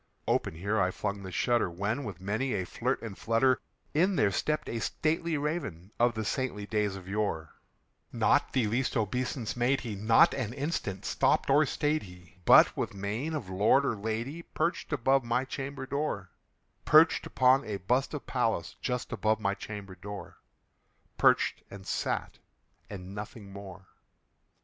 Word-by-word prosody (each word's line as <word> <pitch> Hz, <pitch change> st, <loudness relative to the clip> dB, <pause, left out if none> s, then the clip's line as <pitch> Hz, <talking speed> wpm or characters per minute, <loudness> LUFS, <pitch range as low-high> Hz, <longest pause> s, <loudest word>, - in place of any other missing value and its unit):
Open -, -, +1 dB
here 100 Hz, +5 st, 0 dB
I 90 Hz, -, +3 dB
flung 100 Hz, +1 st, -3 dB
the 95 Hz, -1 st, -7 dB
shutter, 120 Hz, +2 st, +1 dB
when, 100 Hz, +10 st, -2 dB
with 100 Hz, -7 st, -6 dB
many 110 Hz, +8 st, -1 dB
a 95 Hz, -2 st, -1 dB
flirt 125 Hz, +8 st, -2 dB
and 110 Hz, -4 st, -6 dB
flutter, 120 Hz, +5 st, +2 dB, 0.3 s
In 185 Hz, +6 st, +3 dB
there 105 Hz, -, +3 dB
stepped 150 Hz, +9 st, -1 dB
a 115 Hz, -, -3 dB
stately 160 Hz, +6 st, 0 dB
Raven 140 Hz, -, -3 dB
of 120 Hz, -1 st, +3 dB
the 110 Hz, -1 st, -3 dB
saintly 115 Hz, -4 st, -2 dB
days 105 Hz, -2 st, 0 dB
of 95 Hz, -1 st, -10 dB
yore; 95 Hz, -6 st, -2 dB, 0.6 s
Not -, -, +2 dB
the 130 Hz, -4 st, +2 dB
least 120 Hz, +5 st, 0 dB
obeisance 120 Hz, +2 st, -2 dB
made 125 Hz, +3 st, +2 dB
he: 115 Hz, -4 st, -5 dB
not 110 Hz, +3 st, +5 dB
an 120 Hz, -4 st, -3 dB
instant 135 Hz, -, -3 dB
stopped -, -, +2 dB
or 150 Hz, +2 st, +5 dB
stayed 150 Hz, +4 st, 0 dB
he; 90 Hz, -3 st, -14 dB
But, -, -, +7 dB
with -, -, -3 dB
mien 110 Hz, +11 st, -3 dB
of 130 Hz, -10 st, -4 dB
lord 105 Hz, +9 st, +4 dB
or 115 Hz, -, 0 dB
lady, 110 Hz, +9 st, -3 dB
perched 170 Hz, 0 st, -2 dB
above 135 Hz, -1 st, +2 dB
my 120 Hz, +2 st, 0 dB
chamber 135 Hz, 0 st, -5 dB
door 135 Hz, -, -3 dB, 0.5 s
Perched 160 Hz, +2 st, +5 dB
upon 130 Hz, +2 st, +4 dB
a 105 Hz, -2 st, -3 dB
bust 125 Hz, -, 0 dB
of 145 Hz, -, -6 dB
Pallas 115 Hz, -9 st, -1 dB
just 125 Hz, -1 st, -2 dB
above 110 Hz, 0 st, +1 dB
my 100 Hz, -2 st, 0 dB
chamber 100 Hz, -2 st, -7 dB
door 100 Hz, +2 st, -9 dB, 0.8 s
Perched, -, -, +4 dB
and 100 Hz, -1 st, -10 dB
sat, -, -, -2 dB, 0.5 s
and 95 Hz, -2 st, -8 dB
nothing 105 Hz, -1 st, -8 dB
more. 95 Hz, -1 st, -10 dB
110 Hz, 165 wpm, -30 LUFS, 100-135 Hz, 0.8 s, But